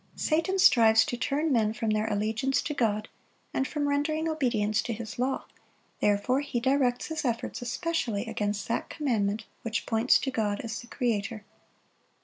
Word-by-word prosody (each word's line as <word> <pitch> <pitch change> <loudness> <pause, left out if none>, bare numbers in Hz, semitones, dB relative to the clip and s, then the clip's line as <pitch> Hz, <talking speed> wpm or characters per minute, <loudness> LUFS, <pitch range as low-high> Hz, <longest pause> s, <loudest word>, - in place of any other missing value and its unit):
Satan 330 +5 +1
strives 225 -9 +6
to - - -3
turn 290 +6 0
men 220 -4 +2
from 220 0 -1
their 215 +1 +1
allegiance 220 +6 0
to 295 - -2
God, 215 -5 0 0.5
and 265 - 0
from 295 -1 -1
rendering 305 +3 0
obedience 235 -9 +1
to 235 - -3
His 225 +1 -7
law; 260 +2 -1 0.5
therefore 210 +6 +2
he 280 -4 -2
directs 260 -1 +1
his 320 -1 -3
efforts 235 -2 -2
especially 245 - -2
against 210 -2 -2
that 230 - -2
commandment 220 -7 -1 0.2
which 230 -1 -2
points 225 +2 +4
to 270 - -2
God 210 -4 -1
as 225 -1 -5
the 240 - -13
Creator. 220 -4 -2
235 Hz, 160 wpm, -28 LUFS, 215-275 Hz, 0.5 s, strives